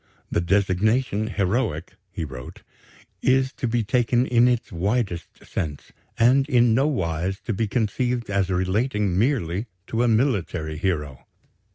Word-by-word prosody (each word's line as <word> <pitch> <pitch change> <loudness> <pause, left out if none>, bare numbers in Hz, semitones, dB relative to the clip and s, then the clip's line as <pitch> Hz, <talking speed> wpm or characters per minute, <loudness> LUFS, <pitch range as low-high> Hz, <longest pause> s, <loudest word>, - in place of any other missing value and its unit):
"The - - +1
designation 100 +4 +1
'heroic,'" 95 - -1 0.2
he 80 - -4
wrote, 65 -3 -10 0.6
"is 130 +1 +2
to 125 - -3
be 115 0 0
taken 120 +3 +2
in 120 -1 +4
its 120 -2 0
widest 95 -1 -2
sense, 75 -4 -5 0.3
and 130 +5 +4
in 120 -4 +4
no 135 +5 +3
wise 95 - -1
to 115 - -3
be 110 +3 -1
conceived 120 +2 -1
as 100 -2 0
relating 100 +2 0
merely 105 - 0 0.2
to 115 +3 -1
a 120 - +3
military 100 - 0
hero. 75 -8 -2
105 Hz, 140 wpm, -24 LUFS, 90-125 Hz, 0.6 s, in